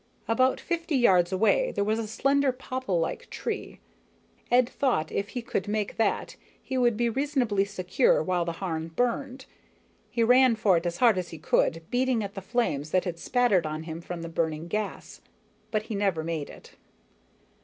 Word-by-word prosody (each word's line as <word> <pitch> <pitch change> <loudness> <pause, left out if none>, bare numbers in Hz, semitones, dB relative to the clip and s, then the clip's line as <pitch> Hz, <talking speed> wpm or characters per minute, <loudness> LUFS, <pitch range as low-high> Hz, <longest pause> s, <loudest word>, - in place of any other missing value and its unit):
About 255 +3 +2
fifty 335 -3 -2
yards 185 -8 +4
away 225 - +2
there 200 - 0
was 215 +2 0
a 225 - -3
slender, 275 +4 +2
popplelike 255 - -3
tree. - - -5 0.7
Ed - - +3
had 250 0 +4
thought 235 - 0
if 200 +1 -2
he 245 - -5
could 195 -4 -2
make 210 -1 -2
that, 225 - 0 0.2
he 265 - -6
would 240 -4 +2
be 240 0 +2
reasonably 245 -6 +1
secure 195 +1 +1
while 180 +1 0
the 170 0 -3
Harn 165 -2 -4
burned. 255 +2 -1 0.6
He 230 - 0
ran 250 +1 +5
for 215 -4 +3
it 170 +1 0
as 175 0 -3
hard 225 -3 +4
as 180 - -5
he 165 - -8
could, 165 +1 +1
beating 250 -2 +1
at 200 0 -6
the 195 - -6
flames 190 - -1
that 185 +3 +1
had 170 -2 -4
spattered 205 -7 +2
on 155 +1 -4
him 160 0 -6
from 170 0 -6
the - - -5
burning 160 -1 -2
gas, 210 +3 -4 0.5
but 215 -2 -1
he 220 - -6
never 195 -6 0
made 160 -3 -3
it. - - -13
210 Hz, 185 wpm, -27 LUFS, 175-245 Hz, 0.7 s, ran